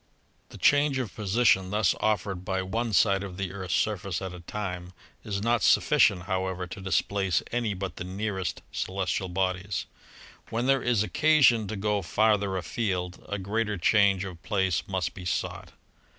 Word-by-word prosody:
The - - -11
change 145 -1 +3
of 125 -7 -3
position 100 -2 +2
thus 105 0 +2
offered 100 -3 -1
by 95 0 -1
one 115 +5 -2
side 100 0 +3
of 95 -2 -7
the 95 -2 -3
Earth's 95 -1 -2
surface 100 -4 -1
at 95 -2 -6
a 90 - -9
time 90 -1 -5 0.3
is 100 -1 -3
not 115 -1 +2
sufficient, 90 -2 +4
how 95 -1 -1
ever, 90 -1 -4
to 95 +2 -9
displace 95 +1 0
any 115 -4 -1
but 95 -2 -5
the - - -4
nearest 95 0 -3
celestial 95 0 -2
bodies. 95 +1 -1 0.6
When 115 +2 -1
there 135 0 +3
is 120 -4 +2
occasion 120 - +4
to 110 - -4
go 105 0 0
farther 105 +1 +1
afield, 90 +1 -3
a 105 - -2
greater 105 +2 -1
change 100 0 +3
of 90 -4 -9
place 95 -5 0
must 90 -3 -2
be 90 - -9
sought. 90 - -3
100 Hz, 165 wpm, -27 LUFS, 95-110 Hz, 0.6 s, sufficient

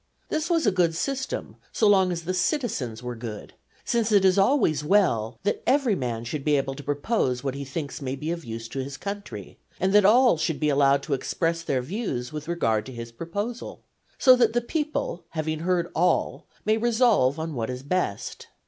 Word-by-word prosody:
This 315 +2 -1
was 335 -4 +2
a 210 - +4
good 175 -3 +2
system 265 +8 -3
so 220 - +2
long 190 -3 +4
as 170 -1 -3
the 185 +3 -2
citizens 165 - -1
were 125 0 -4
good, 110 -2 -7 0.3
since 230 -2 +1
it 200 -2 +5
is 190 +1 +4
always 195 - +3
well 150 - +2
that 205 - 0
every 260 -3 +3
man 120 -9 -2
should 135 +4 -4
be 150 0 +3
able 135 0 -1
to 140 - -8
propose 145 - -1
what 135 -2 -1
he 140 +1 -5
thinks 140 +2 -5
may 130 -1 -3
be 150 +4 -4
of 170 -1 -4
use 115 -1 -6
to 135 - -5
his 135 +1 -7
country, 200 0 -7 0.2
and 190 +1 +1
that 210 0 +7
all 240 0 +5
should 160 -2 -1
be 150 - +1
allowed 140 -1 +3
to 150 - -2
express 165 +5 -1
their 135 -6 -1
views 140 - -4
with 150 0 -6
regard 115 -11 +1
to - - -7
his 115 -1 -7
proposal; 200 - -5 0.3
so 255 -1 +7
that 235 -3 +3
the 240 - +2
people, 295 - -3
having 155 -1 -3
heard 175 0 0
all, 175 +1 +1 0.2
may 215 +1 +3
resolve 225 - +3
on 160 0 -4
what 115 -3 -3
is 125 +1 -5
best. 145 - -2
165 Hz, 200 wpm, -25 LUFS, 135-210 Hz, 0.3 s, that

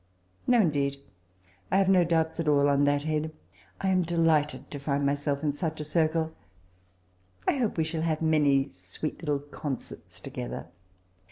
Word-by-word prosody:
*' 90 0 -40
' - - -34
No, 245 -1 +5
indeed, 140 -6 +1 0.7
I 190 - +4
have 195 -1 +4
no 185 -2 +6
doubts 160 -1 +1
at 165 - -1
all 145 -1 +4
on 140 0 +3
that 145 0 +2
head. 155 0 -1 0.5
I 190 - 0
am 185 -1 +3
delighted 155 -5 +1
to 145 - -5
find 140 0 0
myself 140 0 0
in 145 -2 +1
such 160 +1 -3
a - - -2
circle: 160 +1 +1 1.2
I - - +3
hope 235 -8 0
we 160 - +3
shall 160 0 -3
have 160 -1 0
many 145 -4 +3
sweet 90 +12 -6
lltUe 145 -3 -2
concerts 140 -4 -6
together. 60 +3 -6
150 Hz, 175 wpm, -28 LUFS, 140-165 Hz, 1.2 s, no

